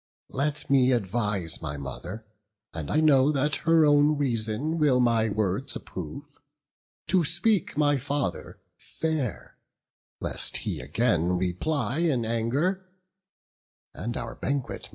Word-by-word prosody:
Let 145 Hz, +2 st, -1 dB
me 130 Hz, -2 st, +4 dB
advise 105 Hz, -6 st, -1 dB
my 75 Hz, -2 st, -4 dB
mother 90 Hz, +10 st, -7 dB, 0.5 s
(and 80 Hz, -3 st, -5 dB
I 155 Hz, -, +2 dB
know 145 Hz, -2 st, +5 dB
That 145 Hz, +1 st, 0 dB
her 165 Hz, -1 st, +6 dB
own 145 Hz, 0 st, +4 dB
reason 130 Hz, +4 st, -1 dB
will 140 Hz, -4 st, +4 dB
my 115 Hz, -2 st, +3 dB
words 105 Hz, +5 st, -2 dB
approve) 140 Hz, -, -8 dB, 0.7 s
To 185 Hz, -2 st, +3 dB
speak 175 Hz, +4 st, +1 dB
my 145 Hz, -2 st, +3 dB
father 140 Hz, -, -3 dB, 0.2 s
fair; 155 Hz, -7 st, -4 dB, 0.6 s
lest -, -, +2 dB
he -, -, -2 dB
again 90 Hz, -, +1 dB
Reply 120 Hz, -, -1 dB
in 145 Hz, -9 st, +1 dB
anger, 135 Hz, +12 st, 0 dB, 1.1 s
and 120 Hz, +2 st, -4 dB
our 115 Hz, 0 st, -5 dB
banquet 140 Hz, -2 st, -3 dB
mar. -, -, -14 dB
130 Hz, 125 wpm, -26 LUFS, 105-150 Hz, 1.1 s, her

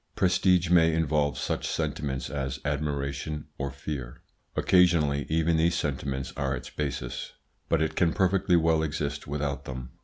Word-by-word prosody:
Prestige 90 Hz, -2 st, +3 dB
may 80 Hz, -2 st, +5 dB
involve 75 Hz, -2 st, +1 dB
such -, -, -2 dB
sentiments 65 Hz, -2 st, -2 dB
as 65 Hz, -2 st, -3 dB
admiration 70 Hz, +1 st, -2 dB
or 70 Hz, 0 st, -1 dB
fear. 70 Hz, -3 st, -6 dB, 0.3 s
Occasionally 80 Hz, -6 st, +3 dB
even 80 Hz, +1 st, +2 dB
these 85 Hz, +1 st, +3 dB
sentiments 70 Hz, -3 st, -2 dB
are -, -, -1 dB
its -, -, -8 dB
basis, 65 Hz, -4 st, -4 dB, 0.4 s
but 80 Hz, -, +3 dB
it 80 Hz, -, -2 dB
can 85 Hz, -3 st, +3 dB
perfectly 95 Hz, -1 st, +2 dB
well 80 Hz, -1 st, +3 dB
exist 75 Hz, -2 st, -3 dB
without 70 Hz, -1 st, -3 dB
them. 65 Hz, -1 st, -6 dB
75 Hz, 145 wpm, -28 LUFS, 70-80 Hz, 0.4 s, may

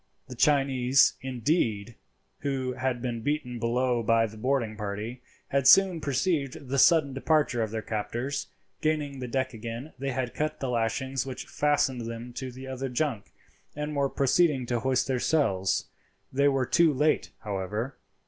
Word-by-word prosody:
The 125 Hz, -, -7 dB
Chinese, 135 Hz, -1 st, +4 dB
indeed, 120 Hz, -, -1 dB, 0.5 s
who 135 Hz, -3 st, -2 dB
had 125 Hz, -1 st, -2 dB
been 120 Hz, -2 st, -3 dB
beaten 125 Hz, -3 st, -2 dB
below 120 Hz, +1 st, +1 dB
by 115 Hz, 0 st, +3 dB
the 110 Hz, 0 st, -8 dB
boarding 120 Hz, -1 st, 0 dB
party, 105 Hz, +4 st, -5 dB, 0.3 s
had 140 Hz, -1 st, +2 dB
soon 185 Hz, +1 st, +6 dB
perceived 140 Hz, -1 st, -1 dB
the 135 Hz, +1 st, +1 dB
sudden 155 Hz, -3 st, +5 dB
departure 135 Hz, -3 st, +1 dB
of 110 Hz, -, -1 dB
their 110 Hz, 0 st, -4 dB
captors. 120 Hz, +6 st, -3 dB, 0.3 s
Gaining 150 Hz, -3 st, -1 dB
the 125 Hz, -, -4 dB
deck 130 Hz, +1 st, -1 dB
again 115 Hz, +6 st, -7 dB
they 140 Hz, +1 st, -2 dB
had 130 Hz, -2 st, -2 dB
cut 155 Hz, 0 st, -2 dB
the 135 Hz, -, -2 dB
lashings 130 Hz, +3 st, -1 dB
which 130 Hz, -1 st, -6 dB
fastened 135 Hz, -5 st, 0 dB
them 115 Hz, +1 st, -7 dB
to 130 Hz, +1 st, -5 dB
the 130 Hz, +2 st, -9 dB
other 130 Hz, 0 st, -4 dB
junk, 125 Hz, -5 st, -2 dB, 0.4 s
and 150 Hz, 0 st, -4 dB
were 140 Hz, -1 st, +1 dB
proceeding 140 Hz, 0 st, +2 dB
to 120 Hz, 0 st, -1 dB
hoist 130 Hz, +1 st, +1 dB
their 130 Hz, -2 st, -1 dB
sails. 100 Hz, -12 st, +1 dB, 0.4 s
They 140 Hz, +2 st, +3 dB
were 135 Hz, -2 st, +2 dB
too 170 Hz, +4 st, +4 dB
late, 150 Hz, +3 st, +1 dB
however. 105 Hz, +6 st, -4 dB
130 Hz, 160 wpm, -28 LUFS, 120-140 Hz, 0.5 s, soon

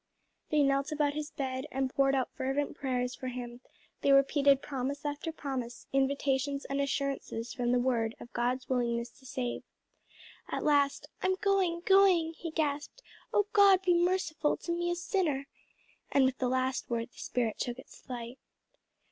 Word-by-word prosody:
They 300 Hz, -1 st, +3 dB
knelt 275 Hz, +2 st, +1 dB
about 295 Hz, -1 st, +1 dB
his 300 Hz, 0 st, -4 dB
bed 260 Hz, 0 st, -4 dB
and 265 Hz, 0 st, -1 dB
poured 275 Hz, 0 st, +3 dB
out 260 Hz, -2 st, 0 dB
fervent 270 Hz, +2 st, -1 dB
prayers 250 Hz, -2 st, -1 dB
for 255 Hz, -, -6 dB
him; 245 Hz, -1 st, -6 dB, 0.4 s
they 280 Hz, -, +3 dB
repeated 275 Hz, 0 st, +5 dB
promise 275 Hz, +1 st, -3 dB
after 290 Hz, +2 st, -3 dB
promise, 260 Hz, -6 st, -5 dB
invitations 275 Hz, 0 st, +1 dB
and 275 Hz, 0 st, -1 dB
assurances 275 Hz, -4 st, -2 dB
from 240 Hz, -1 st, 0 dB
the 250 Hz, -, +4 dB
word, 240 Hz, -3 st, +1 dB
of 240 Hz, -, -12 dB
God's 250 Hz, +2 st, -1 dB
willingness 235 Hz, -2 st, 0 dB
to 265 Hz, -, -14 dB
save. 250 Hz, -1 st, -3 dB, 0.9 s
At -, -, -2 dB
last, 285 Hz, -2 st, +2 dB
"I'm 375 Hz, 0 st, +2 dB
going, 375 Hz, -3 st, +1 dB
going!" 375 Hz, -4 st, +5 dB
he 330 Hz, +1 st, -6 dB
gasped. 300 Hz, +7 st, -2 dB, 0.3 s
"Oh 415 Hz, -, +3 dB
God 395 Hz, -2 st, +6 dB
be 360 Hz, -1 st, +4 dB
merciful 345 Hz, -3 st, +1 dB
to 340 Hz, -, -5 dB
me 345 Hz, 0 st, 0 dB
a 350 Hz, -, 0 dB
sinner!" 340 Hz, -6 st, 0 dB, 0.7 s
And 275 Hz, -2 st, +5 dB
with 260 Hz, 0 st, 0 dB
the 255 Hz, -, +1 dB
last 260 Hz, +1 st, -1 dB
word 230 Hz, -1 st, -2 dB
the -, -, -17 dB
spirit 235 Hz, -3 st, -1 dB
took 245 Hz, 0 st, -2 dB
its 260 Hz, -, -13 dB
flight. 245 Hz, 0 st, -7 dB
275 Hz, 165 wpm, -31 LUFS, 255-305 Hz, 0.9 s, God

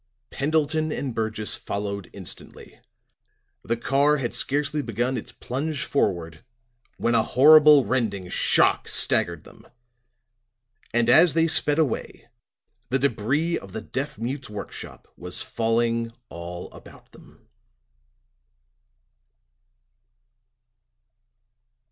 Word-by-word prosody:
Pendleton 155 Hz, +2 st, 0 dB
and 135 Hz, -4 st, -3 dB
Burgess 110 Hz, -1 st, -2 dB
followed 100 Hz, -2 st, -4 dB
instantly. 95 Hz, -4 st, -11 dB, 0.8 s
The 115 Hz, -, -1 dB
car 140 Hz, +5 st, +2 dB
had 125 Hz, -4 st, -3 dB
scarcely 145 Hz, +2 st, -1 dB
begun 120 Hz, +1 st, -2 dB
its 115 Hz, -, -6 dB
plunge 140 Hz, +3 st, -4 dB
forward 85 Hz, -, -1 dB, 0.5 s
when 120 Hz, -, 0 dB
a 115 Hz, -, +4 dB
horrible 150 Hz, +3 st, +7 dB
rending 105 Hz, -8 st, -1 dB
shock -, -, +2 dB
staggered 85 Hz, -2 st, 0 dB
them. -, -, -17 dB, 1.2 s
And 120 Hz, 0 st, +1 dB
as 155 Hz, +6 st, +6 dB
they 165 Hz, 0 st, +4 dB
sped 150 Hz, -2 st, +1 dB
away 150 Hz, -7 st, -2 dB, 0.6 s
the 130 Hz, -, +2 dB
debris 140 Hz, +6 st, 0 dB
of 95 Hz, -1 st, -13 dB
the 110 Hz, -, -4 dB
deaf 135 Hz, +6 st, -5 dB
mute's 130 Hz, +3 st, -5 dB
work 105 Hz, -1 st, -7 dB
shop -, -, -11 dB
was -, -, -3 dB
falling 115 Hz, 0 st, 0 dB, 0.2 s
all 85 Hz, +1 st, -8 dB
about -, -, -16 dB
them. -, -, -19 dB
120 Hz, 105 wpm, -24 LUFS, 110-145 Hz, 1.2 s, horrible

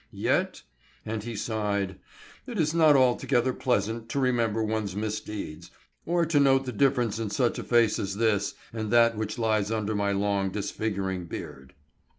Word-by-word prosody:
Yet," -, -, 0 dB, 0.4 s
and 110 Hz, 0 st, -3 dB
he 115 Hz, +2 st, -6 dB
sighed, 100 Hz, -3 st, -2 dB, 0.5 s
"it -, -, -4 dB
is 155 Hz, 0 st, +1 dB
not 160 Hz, -3 st, +5 dB
altogether 130 Hz, -1 st, +2 dB
pleasant 115 Hz, -3 st, -1 dB
to 140 Hz, -, -1 dB
remember 115 Hz, -4 st, +1 dB
one's 110 Hz, -3 st, -2 dB
misdeeds, 105 Hz, -5 st, -5 dB, 0.4 s
or 170 Hz, 0 st, +2 dB
to 155 Hz, -2 st, +2 dB
note 135 Hz, -1 st, +4 dB
the 125 Hz, -, -3 dB
difference 120 Hz, -3 st, +1 dB
in 110 Hz, -2 st, -2 dB
such 120 Hz, +2 st, 0 dB
a -, -, -4 dB
face 120 Hz, -3 st, +3 dB
as 100 Hz, -1 st, -3 dB
this 105 Hz, -3 st, +1 dB, 0.2 s
and 110 Hz, -2 st, -3 dB
that 115 Hz, 0 st, +4 dB
which 110 Hz, +1 st, -3 dB
lies 110 Hz, -3 st, +1 dB
under 110 Hz, -1 st, -1 dB
my 100 Hz, -1 st, 0 dB
long, 100 Hz, -1 st, 0 dB
disfiguring 100 Hz, -2 st, -3 dB
beard." 65 Hz, -5 st, -8 dB
110 Hz, 160 wpm, -27 LUFS, 100-125 Hz, 0.5 s, not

